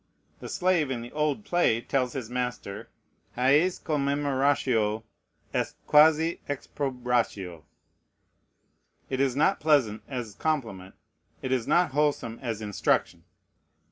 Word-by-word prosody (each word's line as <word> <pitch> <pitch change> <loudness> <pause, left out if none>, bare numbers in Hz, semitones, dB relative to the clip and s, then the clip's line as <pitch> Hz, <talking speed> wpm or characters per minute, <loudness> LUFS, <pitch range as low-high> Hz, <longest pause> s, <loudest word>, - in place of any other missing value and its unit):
The - - -8
slave 180 -5 +1
in 120 -3 -3
the 120 - -10
old 150 +7 -1
play 175 - +2
tells 125 0 -1
his 130 -5 -4
master, 125 -4 -4 0.5
"Hæc 145 +8 +3
commemeratio 140 -7 +1 0.5
est - - -1
quasi 160 +2 +5
exprobratio." 125 - -2 1.5
It 130 - -1
is 135 -2 +1
not 160 +7 +2
pleasant 130 -9 +2
as 120 -5 -5
compliment; 110 -11 -3 0.5
it 130 - -3
is 125 -3 0
not 175 -4 +3
wholesome 145 -5 0
as 115 -4 -4
instruction. 105 -2 0
130 Hz, 110 wpm, -27 LUFS, 115-150 Hz, 1.5 s, quasi